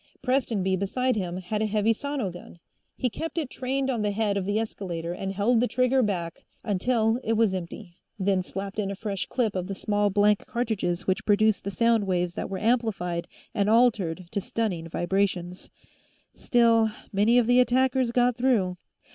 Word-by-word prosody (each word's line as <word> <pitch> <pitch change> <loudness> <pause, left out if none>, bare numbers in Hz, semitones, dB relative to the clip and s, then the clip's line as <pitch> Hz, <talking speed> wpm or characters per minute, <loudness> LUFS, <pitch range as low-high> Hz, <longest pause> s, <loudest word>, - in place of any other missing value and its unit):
Prestonby, 225 -8 +1
beside 250 +7 0
him, 180 -4 -3
had 200 +4 -3
a 220 - +1
heavy 215 +1 +2
sono 270 -5 -3
gun; 175 0 -12 0.4
he 255 - 0
kept 325 +8 -5
it 300 -6 -2
trained 265 +1 -2
on 245 -5 -1
the 210 - +1
head 205 0 0
of 195 -2 -1
the 205 +2 0
escalator 175 -6 -4
and 195 +2 -4
held 210 +5 +2
the 245 - +2
trigger 255 +1 +2
back 180 -7 -2 0.2
until 225 +3 +1
it 225 - 0
was 220 -3 +2
empty, 175 0 -7 0.2
then 195 -1 +1
slapped 195 +2 -6
in 200 -2 -1
a 200 - -4
fresh 200 -1 -4
clip 225 -6 -1
of 185 -1 -2
the 195 - -4
small 205 +1 +1
blank 205 +1 +2
cartridges 205 -7 -2
which 190 0 0
produced 215 0 +3
the 200 - -3
sound 230 0 +2
waves 180 -2 0
that - - -4
were 195 - -3
amplified 210 -7 0 0.3
and 205 -2 +1
altered 210 -7 +2
to 200 - -1
stunning 185 -6 -3
vibrations. 180 0 -1 0.6
Still, 230 -3 +3 0.2
many 210 +5 +4
of 245 - +4
the 245 +2 +4
attackers 255 0 +2
got 245 0 +2
through. 225 -8 +1
210 Hz, 180 wpm, -26 LUFS, 190-235 Hz, 0.6 s, many